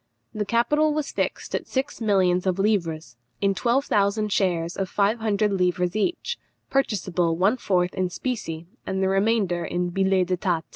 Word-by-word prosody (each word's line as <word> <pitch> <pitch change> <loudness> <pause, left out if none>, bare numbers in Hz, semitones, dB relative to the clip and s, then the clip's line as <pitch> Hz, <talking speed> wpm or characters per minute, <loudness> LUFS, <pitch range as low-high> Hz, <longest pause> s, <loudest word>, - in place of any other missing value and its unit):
The 215 -2 -2
capital 295 +8 +2
was 300 -2 -2
fixed - - -3
at - - -2
six 265 -2 -3
millions 190 -4 +2
of 185 -1 +1
livres, 170 - -1 0.2
in 200 -1 +2
twelve 250 +7 +1
thousand 210 +1 +1
shares 170 -3 0
of 195 -1 -2
five 210 +3 +1
hundred 210 -1 +1
livres 180 -1 0
each, 350 - -1 0.3
purchasable 185 -10 0
one 200 +8 +3
fourth 180 -6 +1
in 185 -1 -1
specie, 175 -7 -4 0.2
and 190 0 -2
the 190 - +2
remainder 195 -3 +1
in 175 0 -2
billets 190 -1 +1
d'état. 175 -2 0
195 Hz, 160 wpm, -24 LUFS, 180-220 Hz, 0.3 s, one